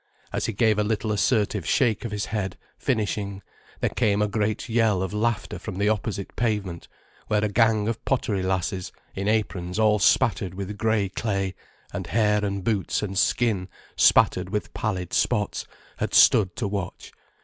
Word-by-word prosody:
As - - -1
he 115 - -2
gave 110 0 +2
a - - +3
little 110 0 -1
assertive 105 -2 +1
shake 110 - +1
of 115 - -4
his 105 0 -2
head, 95 -4 -2 0.2
finishing, 100 -4 -2 0.4
there - - +2
came 100 -1 +1
a 105 - +2
great 105 +2 -1
yell 110 -5 +2
of 95 - -4
laughter 110 0 -1
from - - -6
the 100 +2 +1
opposite 105 -2 -2
pavement, 105 -7 -2 0.4
where 105 0 +2
a - - 0
gang 110 -1 +3
of 115 -1 -3
pottery 110 -7 0
lasses, 95 0 -2 0.2
in 100 +1 -3
aprons 95 -4 -1
all 105 -1 +4
spattered 100 -3 +2
with 100 +1 -5
grey 110 -2 +1
clay, 95 -1 -2 0.4
and - - -4
hair 105 -2 +2
and 100 -1 -2
boots 105 -1 0
and 100 -2 -4
skin 100 -3 +1 0.3
spattered - - +4
with - - -3
pallid 95 -5 -3
spots, 105 -1 0 0.3
had - - -2
stood 95 -5 +6
to 110 - -2
watch. 100 -2 -5
105 Hz, 170 wpm, -25 LUFS, 95-110 Hz, 0.4 s, stood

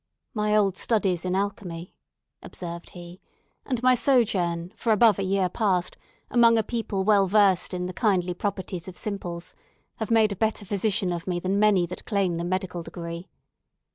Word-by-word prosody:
"My 210 -2 +1
old 195 -3 +2
studies 190 -6 0
in 180 0 0
alchemy," 185 -3 -4 0.5
observed 170 -1 -8
he, 175 +1 -11 0.5
"and 250 -3 -2
my 255 0 +6
sojourn, 200 -9 +1
for 230 - -1
above 215 -2 +5
a - - 0
year 190 0 +1
past, 185 -2 0 0.4
among 230 -1 +5
a 220 - +2
people 215 -4 -2
well 200 -1 +4
versed 195 -2 +3
in 180 -1 -3
the 180 - -5
kindly 185 -6 +1
properties 185 -2 -4
of 185 - -9
simples, 180 -5 -5 0.4
have 220 - -4
made 220 -2 +4
a - - -2
better 220 +1 -1
physician 200 -1 0
of 170 +1 -6
me 175 -1 -1
than 190 +3 0
many 205 -4 +4
that 180 +2 -8
claim 195 -5 0
the 170 - -3
medical 180 0 -2
degree. 170 +1 -7
195 Hz, 170 wpm, -25 LUFS, 180-215 Hz, 0.5 s, my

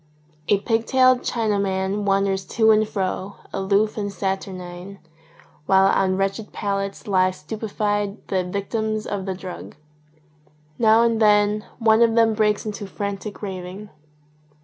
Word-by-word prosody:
A 200 - +4
pig 225 +2 -1
tailed 255 -1 +5
Chinaman 200 -3 -1
wanders 195 -1 +1
to 220 +2 +3
and 215 0 +3
fro, 190 0 -3 0.2
aloof 200 +3 +1
and 205 -1 -3
saturnine, 190 -1 -5 0.7
while 190 0 +5
on 190 -1 +2
wretched 195 +2 -2
pallets 195 -1 -3
lie 185 -2 +3
stupefied 205 +3 -3
the 190 -1 +1
victims 215 +3 -3
of 195 -1 -4
the 190 - -2
drug. 185 -1 -9 1.0
Now 225 0 +5
and 230 -1 +1
then 210 0 +3
one 225 -1 +4
of 230 -1 +4
them 225 -1 +4
breaks 210 -1 +1
into 210 -1 -5
frantic 200 +1 -5
raving. 190 +1 -7
200 Hz, 130 wpm, -22 LUFS, 195-215 Hz, 1.0 s, tailed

